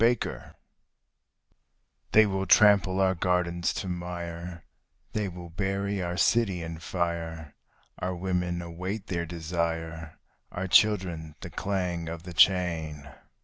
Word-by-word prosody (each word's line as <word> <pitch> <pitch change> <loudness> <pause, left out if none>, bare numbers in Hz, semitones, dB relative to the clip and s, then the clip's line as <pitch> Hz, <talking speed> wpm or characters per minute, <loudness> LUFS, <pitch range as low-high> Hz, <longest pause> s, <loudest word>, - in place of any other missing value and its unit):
PILLAGE 120 +1 0 1.6
They 110 0 +7
will 95 -1 -1
trample 100 -2 +6
our 95 -1 +4
gardens 85 -1 0
to - - -3
mire, 85 -1 -5 0.5
they 105 -2 0
will 85 -1 -9
bury 100 +2 -1
our 90 0 -3
city 95 -7 +2
in 80 0 -6
fire; 85 -3 -3 0.5
Our 90 0 -2
women 90 -1 -1
await 90 +5 -5
their 85 -2 -2
desire, 80 -1 -3 0.3
our 95 +1 -3
children 90 -7 +3
the - - -7
clang 90 -4 -2
of 85 0 -6
the 90 -1 -8
chain. 80 -5 +2
90 Hz, 120 wpm, -28 LUFS, 85-95 Hz, 1.6 s, They